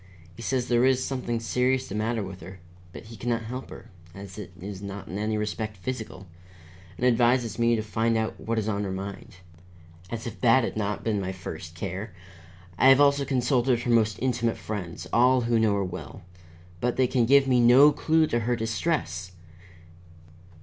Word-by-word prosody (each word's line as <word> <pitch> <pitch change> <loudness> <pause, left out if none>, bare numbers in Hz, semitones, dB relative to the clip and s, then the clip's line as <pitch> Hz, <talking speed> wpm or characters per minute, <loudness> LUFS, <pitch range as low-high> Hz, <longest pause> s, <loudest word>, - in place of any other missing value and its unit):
He - - -10
says 125 0 -1
there 120 0 +3
is 130 0 +3
something 125 -3 -2
serious 125 +3 0
the - - -7
matter 110 +1 -1
with 95 -1 -8
her, 95 +3 -10 0.3
but - - -10
he 115 +1 -11
can 120 +3 -4
not 115 -1 0
help 125 +4 -6
her, - - -12 0.2
as 100 0 -9
it 100 - -8
is 95 +1 -7
not 100 0 -7
in 95 - -5
any 110 +1 -1
respect 105 0 -3
physical, 105 -1 -6 0.7
and 125 - -1
advises 120 -1 +2
me 115 0 +3
to 110 - -2
find 110 +2 0
out 110 0 -2
what 115 0 -3
is 110 -1 -1
on 105 -1 -1
her 95 - -3
mind. 95 0 -7 0.7
As 115 0 -5
if 115 -2 -7
that 120 +1 +5
had - - -3
not 105 -1 -2
been 105 -3 0
my 95 0 -3
first 85 -3 -8
care! 95 +3 -5 0.6
I - - +6
have 135 0 +7
also 140 -1 +4
consulted 125 -2 +1
her 120 - 0
most 110 -2 +3
intimate 120 -2 0
friends, 90 -5 -6
all 125 +2 +4
who 115 -1 +1
know 110 -2 +3
her 100 -1 0
well, 90 - -8 0.6
but 125 +6 0
they 130 - +3
can 120 -2 +1
give 140 +1 +5
me 125 -2 +3
no 125 +5 +7
clue 160 +1 +2
to 120 -6 0
her 120 +2 0
distress. 110 - -2
115 Hz, 195 wpm, -26 LUFS, 100-125 Hz, 0.7 s, have